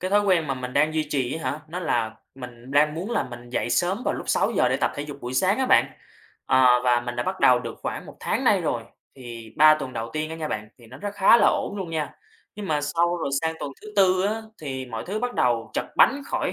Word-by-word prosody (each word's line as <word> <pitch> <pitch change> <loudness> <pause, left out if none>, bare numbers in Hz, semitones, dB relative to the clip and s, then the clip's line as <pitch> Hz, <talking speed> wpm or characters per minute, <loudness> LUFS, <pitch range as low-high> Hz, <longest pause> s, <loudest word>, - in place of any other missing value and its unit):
cái 185 +1 -3
thói 205 +1 +5
quen 185 -6 +2
mà 135 - -1
mình 125 0 -6
đang 155 +2 +2
duy 155 -1 +1
trì 130 -3 -1
á - - 0
hả? 150 - -6
Nó 175 +3 -5
là 115 -9 -1 0.2
mình 125 -1 -11
đang 150 +2 +3
muốn 185 +7 -5
là 230 - +1
mình 120 -1 -10
dậy 120 - -1
sớm 185 - +1
vào - - 0
lúc - - -7
6:00 - - +2
để - - +1
tập - - 0
thể 145 - -4
dục 145 -1 -8
buổi 125 +1 -5
sáng 190 - +2
á 265 - +1
bạn. - - +5 0.6
Ờ, 125 -1 +5
và 120 -1 +3
mình 120 0 -6
đã 120 - 0
bắt 185 +6 -4
đầu 125 -1 +6
được - - -7
khoảng - - -4
1 - - -12
tháng - - -1
nay - - +4
rồi. - - -1 0.3
Thì 115 -3 -9
3 155 +1 +8
tuần 140 -4 -6
đầu 115 0 -5
tiên 155 0 -3
á 160 - -5
nha 155 -1 -4
bạn, 105 -4 -4
thì 120 - -16
nó 130 +4 -12
rất 205 +5 -5
khá 205 +4 +6
là - - +4
ổn 205 - 0
luôn 185 -4 -5
nha. 155 -2 -3 0.4
Nhưng 210 -1 -6
mà 150 -3 0
sau 170 +4 +1
rồi 165 - -3
sang 160 0 -1
tuần 140 - -4
thứ 215 - -10
4 185 -1 +4
á, 220 +2 -2 0.2
thì 130 -3 -5
mọi 115 -2 -6
thứ 205 +3 -3
bắt 245 +1 -3
đầu 115 -2 +1
trật - - -1
bánh 280 +2 +4
khỏi - - -1
150 Hz, 270 wpm, -24 LUFS, 125-185 Hz, 0.6 s, 3